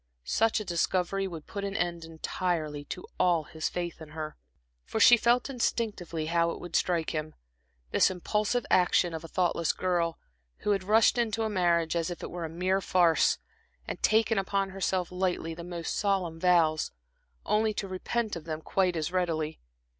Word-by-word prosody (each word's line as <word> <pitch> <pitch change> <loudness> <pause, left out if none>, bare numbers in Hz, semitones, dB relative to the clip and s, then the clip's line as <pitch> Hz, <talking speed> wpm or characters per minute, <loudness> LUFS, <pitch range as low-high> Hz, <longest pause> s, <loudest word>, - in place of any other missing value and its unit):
Such 225 - +2
a 215 - -5
discovery 185 +2 0
would 165 -4 -8
put 200 - -6
an 200 0 -2
end 170 -3 -2
entirely 160 -2 -2
to 180 - -7
all 175 -3 +3
his 155 +1 -4
faith 175 -2 -4
in 155 - -9
her. 155 -1 -4 0.5
For - - -3
she 240 - +9
felt 240 +1 +2
instinctively 215 - -2
how 170 +1 +2
it - - -5
would 175 -1 -7
strike 170 -3 +1
him 155 0 -4 0.6
this - - +4
impulsive 210 +6 -1
action 180 -1 +4
of 160 0 -5
a - - -7
thoughtless 170 -2 +1
girl, 175 -3 0 0.4
who 210 - +1
had 195 -2 +1
rushed 220 +4 +4
into 225 -1 0
marriage 170 -4 +2
as 165 0 0
if 175 - -6
it - - -5
were 175 -1 -4
a - - -5
mere 185 +4 0
farce, 175 -4 +3 0.5
and - - -5
taken 220 -1 +3
upon 195 0 -1
herself, 185 -1 -1
lightly, 180 -3 -1
the 170 +1 -8
most 170 -1 -4
solemn 185 -5 0
vows, 165 -3 +3 0.6
only 215 +1 +2
to 195 - -3
repent 210 +4 -2
of 165 -2 -8
them 155 -1 -4
quite 185 -2 +1
as 160 +1 -2
readily. 160 -4 -1
180 Hz, 175 wpm, -29 LUFS, 165-195 Hz, 0.6 s, she